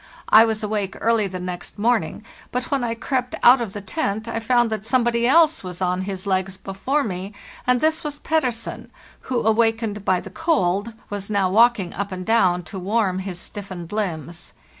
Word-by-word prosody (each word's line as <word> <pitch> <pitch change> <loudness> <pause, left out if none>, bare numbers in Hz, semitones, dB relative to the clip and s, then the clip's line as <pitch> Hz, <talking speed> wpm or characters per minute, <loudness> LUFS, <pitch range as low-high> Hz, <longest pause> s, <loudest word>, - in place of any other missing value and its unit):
I 220 +1 +8
was 220 -1 -2
awake 210 -2 -2
early 225 -2 +2
the 185 -1 -6
next 180 -1 -6
morning; 235 +4 0 0.3
but 250 0 -3
when 275 -3 +1
I 230 -1 -1
crept 250 +1 -2
out 245 +1 +7
of 215 -5 -4
the 205 - -6
tent 215 -1 -2
I 230 0 -2
found 240 0 +2
that 215 -2 -3
somebody 235 0 +2
else 320 +1 +4
was 180 -1 -6
on 180 0 0
his 190 -1 -5
legs 190 -1 -1
before 255 +12 -1
me, 195 -1 -5 0.3
and 250 -1 +3
this 315 0 +1
was 295 -1 -4
Pettersen, 260 -7 -2 0.4
who, 250 -2 0
awakened 225 -2 +1
by 185 -2 +2
the - - -10
cold, 230 - 0 0.2
was 200 0 -4
now 200 -3 +1
walking 225 -3 +4
up 200 +1 -4
and 185 -1 -5
down 185 -6 +3
to 190 +2 -7
warm 195 -1 0
his 185 -2 -5
stiffened 185 -4 -8
limbs. 175 -5 -4
215 Hz, 185 wpm, -22 LUFS, 190-240 Hz, 0.4 s, I